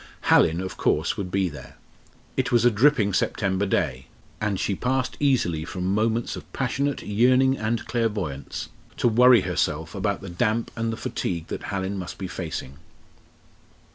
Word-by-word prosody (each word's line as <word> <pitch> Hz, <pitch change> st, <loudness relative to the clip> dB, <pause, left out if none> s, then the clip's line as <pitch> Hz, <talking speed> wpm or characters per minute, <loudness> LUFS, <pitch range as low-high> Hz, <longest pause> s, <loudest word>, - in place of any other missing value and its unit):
Hallin, 85 Hz, +2 st, +5 dB
of 95 Hz, -, -6 dB
course, -, -, +1 dB
would 95 Hz, -3 st, -4 dB
be 95 Hz, 0 st, +1 dB
there. 75 Hz, -3 st, -10 dB, 0.6 s
It -, -, 0 dB
was 120 Hz, -1 st, +4 dB
a 120 Hz, -, +6 dB
dripping 110 Hz, -3 st, +3 dB
September 95 Hz, +2 st, 0 dB
day, 65 Hz, -7 st, -1 dB, 0.3 s
and 105 Hz, -3 st, 0 dB
she 100 Hz, -, 0 dB
passed 130 Hz, +5 st, -1 dB
easily 120 Hz, -, +1 dB
from 90 Hz, +2 st, -2 dB
moments 115 Hz, +2 st, 0 dB
of -, -, -10 dB
passionate 140 Hz, 0 st, -1 dB
yearning 130 Hz, +5 st, +3 dB
and 110 Hz, +1 st, -1 dB
clairvoyance 105 Hz, -, -3 dB, 0.3 s
to -, -, +2 dB
worry 120 Hz, 0 st, +6 dB
herself 80 Hz, -2 st, -1 dB
about 100 Hz, 0 st, -1 dB
the 100 Hz, -, -8 dB
damp 110 Hz, +6 st, 0 dB
and 115 Hz, 0 st, -1 dB
the 110 Hz, -, -4 dB
fatigue 100 Hz, -10 st, -3 dB
that -, -, -5 dB
Hallin 95 Hz, 0 st, -3 dB
must 90 Hz, -1 st, -6 dB
be 95 Hz, -, -4 dB
facing. 80 Hz, -6 st, -6 dB
100 Hz, 160 wpm, -25 LUFS, 90-120 Hz, 0.6 s, a